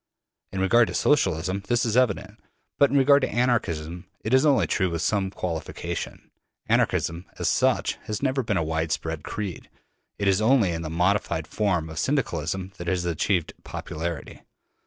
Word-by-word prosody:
In 95 - -3
regard 110 +5 +4
to - - -5
Socialism 95 - +1
this 120 0 +2
is 115 -1 0
evident; 110 -4 +1 0.4
but 140 - +6
in 140 - +2
regard 140 +1 +6
to - - 0
Anarchism 90 -8 -1
it 110 - -2
is 130 +3 +5
only 130 - +4
true 95 +4 +1
with 85 0 -2
some 100 -3 +1
qualification. 85 -4 -5 0.3
Anarchism 85 +2 +1
as - - -1
such - - +1
has 105 - -3
never 135 0 +1
been 110 -5 -1
a 80 - +1
widespread 80 0 -2
creed, 100 -6 -5 0.5
it 100 - -1
is 95 +1 +3
only 110 -5 +4
in 80 -1 -3
the 80 - -4
modified 90 -1 +1
form 90 -1 0
of 80 0 -6
Syndicalism 95 - -1
that 85 - -7
it - - +2
has 90 -1 -1
achieved 85 +1 0
popularity. 80 -1 -5
95 Hz, 170 wpm, -25 LUFS, 85-115 Hz, 0.5 s, but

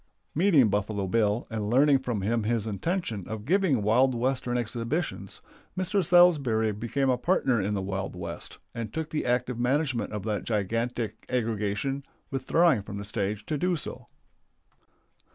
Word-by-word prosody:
Meeting 160 - +5
Buffalo 105 0 -1
Bill 105 +3 +1
and 105 -2 -2
learning 135 +3 +5
from 120 -6 -3
him 115 +3 +1
his 110 0 0
intention 110 - -2
of 110 -1 -6
giving 170 - +2
wild 125 +5 +3
Western 125 0 0
exhibitions, 120 +8 -3 0.4
Mr. 185 +1 +1
Salsbury 145 -11 +4
became 120 +6 -1
a 125 -1 +2
partner 130 - +2
in 105 +2 -1
the 95 - -2
Wild 95 -1 -3
West, 85 -1 -6 0.2
and 115 -3 -5
took 160 +2 -4
the 150 - -2
active 125 0 0
management 130 0 0
of 105 -2 -4
that 105 -3 -2
gigantic 115 +1 -2
aggregation, 115 +3 -1 0.3
withdrawing 145 0 +3
from 100 +1 -7
the 100 - -6
stage 100 0 -2
to 150 +3 -2
do 180 +2 +1
so. 150 - -6
120 Hz, 150 wpm, -27 LUFS, 105-140 Hz, 0.4 s, Meeting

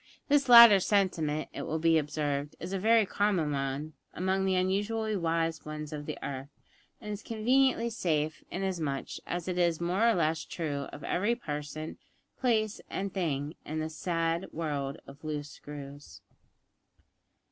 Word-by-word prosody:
This 280 -2 +3
latter 235 -4 +11
sentiment, 175 -7 +1
it - - -5
will 160 - -2
be 165 0 +4
observed, 145 -1 -2
is 180 +3 -5
a 195 - -1
very 225 +2 +4
common 190 -7 +1
one 140 +2 -3 0.2
among 190 +1 0
the 190 -1 +2
unusually 205 +4 0
wise 165 -2 0
ones 150 0 -6
of 145 -1 -6
the 155 - -4
earth, 135 0 -5 0.5
and 210 -1 -5
is 205 - -6
conveniently 235 +2 +2
safe, 155 -7 -1
inasmuch 170 -7 -2 0.2
as 175 0 -3
it 180 -1 -1
is 170 -2 +2
more 185 +7 +2
or 230 - +3
less 160 -2 +1
true 145 -4 -3
of 145 - -10
every 210 +6 +1
person, 150 - -6 0.4
place, 220 -4 +1
and 195 0 -3
thing 150 -5 -1
in 155 +1 -4
this 155 0 -4
sad 165 +1 -1
world 145 -4 -3
of 140 +2 -14
loose 150 -1 -4
screws. 145 0 -10
165 Hz, 155 wpm, -30 LUFS, 150-200 Hz, 0.5 s, latter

